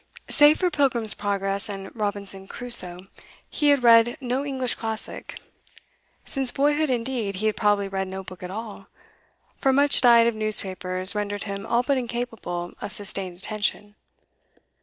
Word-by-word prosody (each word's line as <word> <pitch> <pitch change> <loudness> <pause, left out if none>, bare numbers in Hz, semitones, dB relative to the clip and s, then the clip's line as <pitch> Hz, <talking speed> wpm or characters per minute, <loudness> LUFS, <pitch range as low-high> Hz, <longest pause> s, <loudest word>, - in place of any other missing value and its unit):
Save 295 +1 +6
for 360 -2 0
Pilgrim's 260 -7 +3
Progress 200 0 -1
and 195 -1 -7
Robinson 200 -2 -2
Crusoe, 185 -8 0 0.5
he 295 - 0
had 285 -3 +4
read 235 +2 +5
no 255 +1 -2
English 260 -3 0
classic; 220 -1 -6 0.9
since 270 -2 -1
boyhood, 295 +3 +1
indeed, 235 -4 -1
he 205 +4 -3
had 215 - +1
probably 205 -2 +1
read 195 0 -3
no 190 +1 -6
book 185 -1 -11
at 180 - -6
all, 205 -1 -8 0.7
for 270 - +2
much 280 +2 +4
diet 235 -2 +6
of 235 - +2
newspapers 190 -3 0
rendered 205 -1 -3
him 200 0 -6
all 235 +1 +1
but 275 0 +1
incapable 225 -8 -5
of 205 - -5
sustained 195 -3 -4
attention. 210 +1 -3
215 Hz, 150 wpm, -24 LUFS, 195-245 Hz, 0.9 s, Save